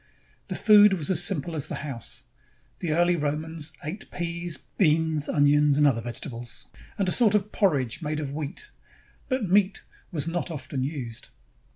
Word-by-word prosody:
The - - -4
food 210 -2 +7
was 160 -1 -1
as 175 -2 +4
simple 170 -3 -1
as 145 - -2
the - - -4
house. 130 -5 -7 0.6
The 170 - -2
early 175 +2 +3
Romans 155 +1 -3
ate 170 +8 -6
peas, 170 -1 -3 0.2
beans, 160 -3 +2
onions, 145 0 +4
and 150 - +5
other 125 -5 +3
vegetables, 115 -2 -6 0.3
and 195 - 0
a - - +2
sort 215 -2 +4
of 210 0 0
porridge 140 - +1
made 155 -1 -2
of 145 -3 -4
wheat; 155 - -6 0.6
but 255 -6 0
meat 195 +1 +2 0.3
was 160 -3 -1
not 175 +2 -2
often 135 -4 -4
used. 130 -5 -5
155 Hz, 165 wpm, -26 LUFS, 145-180 Hz, 0.6 s, food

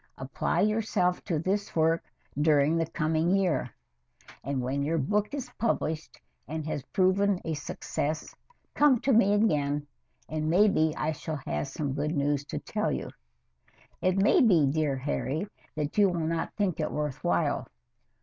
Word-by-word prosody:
Apply - - -1
yourself 210 -4 +1
to 170 -5 0
this 195 +6 -2
work 165 +1 +2 0.3
during 150 +1 +3
the 165 -1 0
coming 160 0 0
year, 190 -5 +1 0.7
and 140 +1 -2
when 130 +3 -1
your 155 +4 0
book 205 +9 0
is 265 -4 -5
published 160 -8 -1 0.3
and 155 0 -4
has 155 -2 -3
proven 195 0 +2
a 165 - -1
success, 150 +1 -4 0.4
come 290 -5 +4
to 270 - +2
me 205 -3 +5
again, 150 -8 +1 0.4
and 155 0 -2
maybe 175 -3 +4
I 155 - 0
shall 155 0 -5
have - - -2
some 140 -1 -3
good 150 +3 -1
news 145 0 +1
to - - -5
tell - - -2
you. - - -4 0.9
It 185 +1 +2
may 205 - +5
be, 180 - +5
dear 145 0 +1
Harry, 145 +5 -2 0.3
that 150 -1 -3
you 200 -2 +6
will 175 -2 -2
not 165 0 -2
think 195 -6 0
it 155 - -1
worth 150 -3 -3
while. - - +1
160 Hz, 160 wpm, -28 LUFS, 150-195 Hz, 0.9 s, you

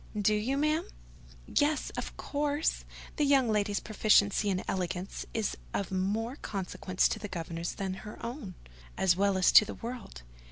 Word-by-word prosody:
"Do 210 +1 +3
you, 225 +6 0
ma'am?" 305 +5 +1 0.6
"Yes, 295 +1 +1
of - - -6
course: 290 +1 -1 0.3
the 300 - +2
young 270 -5 +4
lady's 205 -1 +1
proficiency 210 -1 +3
and 185 -1 0
elegance 180 0 -3
is 220 -3 -1 0.2
of 195 - -2
more 210 +7 -1
consequence 185 -2 -1
to - - -2
the 210 - -5
governess 170 -2 -4
than 190 -1 -3
her 210 - -9
own, 235 - -6 0.4
as 180 -2 +4
well 200 0 +2
as 185 - +5
to - - +9
the 215 - -6
world. 235 - -7
210 Hz, 160 wpm, -30 LUFS, 190-255 Hz, 0.6 s, to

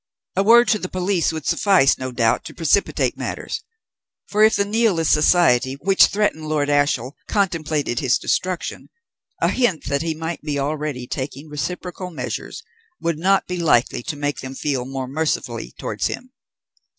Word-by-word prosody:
A - - +3
word 235 +4 +6
to 215 - +3
the 185 - -5
police 185 -2 0
would 160 -2 -6
suffice, 190 -9 +3
no 130 0 -4
doubt, 115 -2 +1
to - - -9
precipitate 170 +4 +1
matters; - - -4 0.6
for, 210 +1 +2
if 220 0 +5
the 200 - +1
Nihilist 205 -6 +2
Society 150 -5 +4
which 190 +7 +4
threatened 195 -7 -1
Lord 145 -2 0
Ashiel 145 -3 +1
contemplated 155 - 0
his 130 -3 +2
destruction, 185 -1 -2 0.5
a - - +4
hint 240 -11 +1
that 140 0 -1
he 165 -1 -2
might 165 +1 -5
be 150 -2 -3
already 145 -2 -2
taking 140 +4 -5
reciprocal 180 +5 -5
measures 165 - -5 0.4
would 165 -2 -1
not 195 +3 +3
be 180 - -4
likely 125 -7 +2
to 150 - -5
make 145 -1 -2
them 130 0 -7
feel 135 -3 -2
more 135 0 -4
mercifully 155 +4 -2
towards - - -2
him. 255 +1 -6
155 Hz, 165 wpm, -21 LUFS, 140-185 Hz, 0.6 s, word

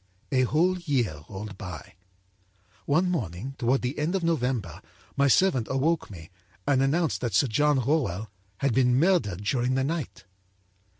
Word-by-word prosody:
âA 130 -2 +3
whole 175 +7 +2
year 125 - -1
rolled 100 0 -8
by. 90 - -8 0.9
One 175 +5 +2
morning, 120 - -3
toward 125 +3 +1
the 125 +4 -2
end 160 +5 0
of 190 - -1
November, 125 - -1 0.3
my 140 0 +3
servant 135 -5 +3
awoke 150 +5 0
me 85 -5 -11 0.3
and 135 -2 +2
announced 155 +4 +1
that 120 -6 -2
Sir 140 - +4
John 145 +4 +2
Rowell 110 - -1 0.3
had 140 -3 +2
been 125 0 +3
murdered 125 - +1
during 125 +4 0
the 135 - +1
night. 155 -1 -4
130 Hz, 155 wpm, -26 LUFS, 110-150 Hz, 0.9 s, Sir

